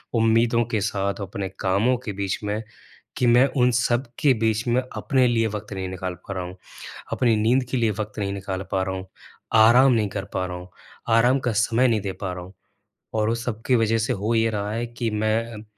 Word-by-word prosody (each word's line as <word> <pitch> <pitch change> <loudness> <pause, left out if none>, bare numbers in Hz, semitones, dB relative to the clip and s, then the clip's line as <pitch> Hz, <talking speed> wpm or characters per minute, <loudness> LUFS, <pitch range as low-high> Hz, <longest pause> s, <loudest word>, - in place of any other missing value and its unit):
उम्मीदों 115 +1 +3
के 110 -3 0
साथ, 100 -1 -2
अपने 95 0 -4
कामों 100 +7 +2
के 105 - -3
बीच 100 -1 -2
में 105 +1 -2 0.6
कि 125 - +2
मैं 120 +2 +6
उन 125 -1 +4
सब 120 +2 +1
के 140 -3 +4
बीच 110 0 +1
में 120 +2 +2 0.2
अपने 130 -2 +2
लिए 115 -2 +2
वक़्त 105 -1 -6
नहीं 95 -1 -4
निकाल 95 0 -4
पा 100 - -4
रहा 90 -1 -3
हूँ। 90 +1 -8 0.6
अपनी 120 -3 +2
नींद 120 +5 +2
के 130 - 0
लिए 115 -3 +2
वक़्त 110 - -5
नहीं 100 -1 -1
निकाल 95 -1 -4
पा 95 - +1
रहा 95 0 -2
हूँ, 95 0 -7 0.5
आराम 120 +4 +7
नहीं 110 -3 +1
कर 100 -1 -4
पा 95 - 0
रहा 90 -1 -5
हूँ, 90 +1 -10 0.4
आराम 120 +4 +4
का 120 -2 -1
समय 115 +4 +2
नहीं 115 -2 +1
दे 100 -1 -3
पा 95 -2 -2
रहा 90 -1 -7
हूँ। 95 +2 -14 0.6
और 110 0 +1
उस 115 +1 -2
सब 115 -3 -3
की 130 - +4
वजह 115 -1 +2
से 110 - 0
हो 105 +4 -1
ये 115 0 +3
रहा 105 -1 -3
है 115 +2 -2
कि 120 0 -3
मैं, 110 +1 -1
110 Hz, 225 wpm, -24 LUFS, 100-120 Hz, 0.6 s, आराम